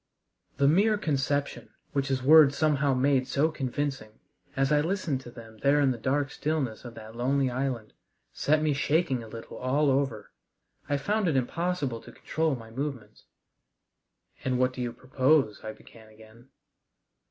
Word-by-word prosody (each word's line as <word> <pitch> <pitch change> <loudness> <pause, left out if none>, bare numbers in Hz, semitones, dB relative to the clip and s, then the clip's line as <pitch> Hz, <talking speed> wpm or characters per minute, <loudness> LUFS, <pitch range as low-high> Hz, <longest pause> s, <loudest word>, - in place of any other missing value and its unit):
The 140 - +3
mere 205 +8 +4
conception, 145 -5 -1 0.2
which 140 -1 0
his 130 -1 -1
words 150 0 +7
somehow 145 -3 +2
made 130 0 +2
so 140 +4 +1
convincing, 135 -5 -4 0.4
as 135 +1 +1
I 150 -1 +4
listened 165 -5 -1
to 125 - -11
them 115 -2 -13
there 140 +4 +3
in 140 -2 +3
the 120 - -4
dark 135 +3 0
stillness 145 -7 -2
of 120 -2 -9
that 110 0 -11
lonely 130 +2 +1
island, 125 -4 -3 0.4
set 155 +1 +1
me 155 -1 +2
shaking 140 -2 +1
a 115 - -9
little 115 +1 -9
all 140 +3 +1
over. 135 -2 -1 0.6
I 145 - +2
found 205 +8 0
it 160 - +1
impossible 140 -2 -1
to - - -13
control 160 -2 -1
my 115 -2 -11
movements. 135 -2 -6 1.2
"And 130 -1 0
what 130 0 +2
do 125 - -6
you 120 -1 -2
propose?" 130 -1 +1
I 110 - -5
began 110 0 -16
again. 110 +3 -18
135 Hz, 165 wpm, -28 LUFS, 125-145 Hz, 1.2 s, words